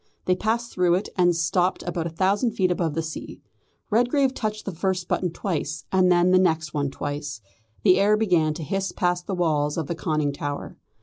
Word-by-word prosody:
They 185 - +3
passed 230 +4 -1
through 180 -1 +2
it, 190 - -2
and 175 -2 +3
stopped 175 +2 +1
about 170 -1 -2
a - - -4
thousand 195 +7 +1
feet 185 -2 +1
above 170 -4 -1
the 165 - -1
sea. 160 0 -7 0.5
Redgrave 255 +4 +2
touched 215 -3 -3
the 195 - -3
first 185 +1 -1
button 180 - 0
twice, 165 -3 -3
and 185 -1 +4
then 175 +1 +4
the 185 - +6
next 160 -4 +1
one 145 -2 0
twice. 145 -1 -5 0.4
The 185 -2 +5
air 210 +2 +4
began 170 -8 +2
to 160 - -5
hiss 195 +6 -2
past 175 -1 -1
the 195 - -2
walls 150 -4 0
of 160 - -1
the 170 - -3
conning 155 -3 -1
tower. 145 0 -5
175 Hz, 200 wpm, -24 LUFS, 160-195 Hz, 0.5 s, the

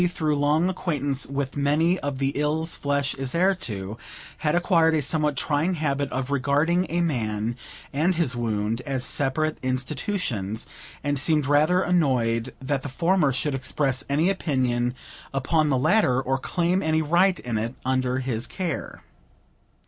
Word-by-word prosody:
through 155 -3 0
long 150 +4 +2
acquaintance 145 -7 -1
with 140 -1 -3
many 155 +6 +2
of 140 -2 -3
the 135 0 +1
ills 150 +3 0
flesh 140 -1 0
is 135 +2 -4
heir 185 +3 +4
to, 105 - -5 0.4
had 150 +1 +1
acquired 165 -3 +3
a 155 - +2
somewhat 150 -1 0
trying 155 +7 +1
habit 140 -3 -1
of 130 +1 -3
regarding 145 +6 +2
a 175 +2 0
man 115 -7 -1 0.4
and 165 +6 +2
his 155 -7 0
wound 110 0 -1
as 135 -2 -1
separate 155 +3 0
institutions, 130 - -2 0.4
and 145 -1 0
seemed 150 +1 +2
rather 155 +6 +3
annoyed 125 -10 +1
that 135 +1 -2
the 145 - -6
former 165 +1 +2
should 140 +3 -1
express 135 0 0
any 150 +5 +2
opinion 125 -8 0 0.4
upon 150 +3 +2
the 135 - +2
latter, 130 - +3
or 135 0 -1
claim 175 +6 0
any 160 -1 +1
right 175 +4 +3
in 115 -3 -2
it, 115 +4 -3
while 130 - +1
under 130 -1 0
his 125 -3 -2
care. 180 -3 -4
145 Hz, 155 wpm, -25 LUFS, 130-160 Hz, 0.4 s, heir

